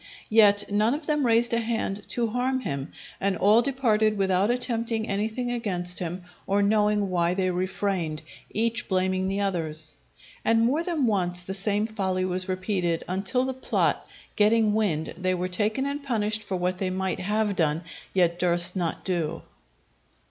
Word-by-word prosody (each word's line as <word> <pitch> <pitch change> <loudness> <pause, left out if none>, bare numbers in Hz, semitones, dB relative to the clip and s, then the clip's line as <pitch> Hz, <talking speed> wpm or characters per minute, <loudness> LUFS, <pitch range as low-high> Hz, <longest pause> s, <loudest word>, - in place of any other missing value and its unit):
Yet 205 -2 +6
none 215 +5 +2
of 300 +1 -7
them 295 -4 +1
raised 230 +1 +3
a 230 - +3
hand 225 -3 -2
to 240 - 0
harm 250 +3 -1
him, 140 - -4 0.3
and 195 -2 0
all 210 +4 +5
departed 220 -5 +1
without 190 +1 +2
attempting 230 -2 -1
anything 220 +5 -2
against 180 -7 -1
him 180 +1 -4 0.2
or 200 +1 +2
knowing 210 -1 +2
why 175 0 +1
they 185 -1 +1
refrained; 180 -3 -2 0.3
each 230 +2 -1
blaming 185 0 0
the 195 +1 -1
others. 160 -5 -1 0.5
And 225 0 +3
more 280 +7 +2
than 335 -6 0
once 180 -5 0
the 185 +2 -6
same 205 +1 +1
folly 190 -4 -1
was 185 +1 -1
repeated, 185 -3 -1
until 195 +8 0
the 265 - -2
plot 260 - 0 0.3
getting 215 0 +3
wind, 185 -8 0
they 185 0 +1
were 180 +1 -2
taken 215 +7 0
and 280 +1 -3
punished 220 -4 -1
for 190 -2 -3
what 180 +1 -1
they 190 - -1
might 190 0 -2
have 210 +2 0
done, 160 0 +1 0.3
yet 175 -2 +2
durst 175 0 +2
not 175 -3 -2
do. 175 -5 -2
200 Hz, 165 wpm, -26 LUFS, 185-225 Hz, 0.5 s, Yet